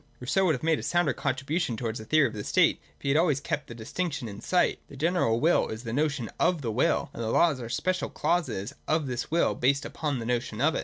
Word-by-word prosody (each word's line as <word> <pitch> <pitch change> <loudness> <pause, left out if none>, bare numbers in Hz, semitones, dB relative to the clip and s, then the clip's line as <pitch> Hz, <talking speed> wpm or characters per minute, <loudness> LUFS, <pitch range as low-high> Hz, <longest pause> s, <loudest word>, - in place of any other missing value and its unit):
Rousseau 150 +10 +1
would 160 - +3
have 125 - -8
made 160 -1 +2
a - - -5
sounder 175 0 +1
contribution 140 -1 -1
towards 115 -1 -3
a 110 - -8
theory 155 +3 +4
of - - -2
the 105 -1 -5
state, - - +3 0.2
if - - -25
he 140 - -1
had 140 - +4
always 155 -5 +2
kept 145 0 -3
this 120 - -9
distinction 140 +2 -3
in 100 -1 -8
sight. 180 -1 +2
The 140 - -12
general 155 -7 +1
will 165 +6 +3
is 110 +2 -6
the 115 -2 -4
notion 140 -4 0
of 170 -5 +2
the 115 - -1
will: 120 +5 +1
and - - -6
the 110 - -2
laws 150 +1 +3
are 120 - -5
the - - -7
special 185 +8 -1
clauses 130 - -1
of 155 -1 +1
this 125 -2 -3
will 170 +2 +2
and - - -7
based 140 +3 +2
upon 150 -4 -2
the 115 - -5
notion 120 -2 -2
of 155 +5 +3
it. - - -1
140 Hz, 265 wpm, -28 LUFS, 120-160 Hz, 0.2 s, theory